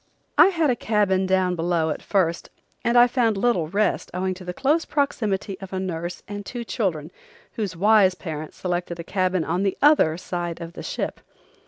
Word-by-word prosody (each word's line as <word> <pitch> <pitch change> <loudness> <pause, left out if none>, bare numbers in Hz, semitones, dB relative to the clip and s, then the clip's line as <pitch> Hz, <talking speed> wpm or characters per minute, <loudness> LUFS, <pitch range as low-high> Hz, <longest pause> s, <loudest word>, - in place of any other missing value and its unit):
I - - +8
had 330 -7 +2
a - - +1
cabin 200 -5 +1
down 185 -1 +2
below 165 -1 0
at - - -4
first 180 -4 0 0.3
and 235 +1 +2
I 240 - +9
found 240 -4 +1
little 195 -7 +1
rest 205 +6 0
owing 185 +1 -1
to 185 0 -11
the 180 - -4
close 295 - +1
proximity 210 -9 -1
of 195 0 -9
a 190 - -1
nurse 175 -1 -4
and 205 0 -6
two 240 +4 -6
children 175 -9 -2 0.4
whose 200 -6 -4
wise 200 0 +4
parents 155 -4 -7
selected 175 -1 -3
a - - -4
cabin 185 -1 0
on 175 +4 -1
the 195 -1 0
other 285 - +4
side 175 -2 -4
of 170 0 -8
the - - -8
ship. - - -4
190 Hz, 190 wpm, -23 LUFS, 175-215 Hz, 0.4 s, I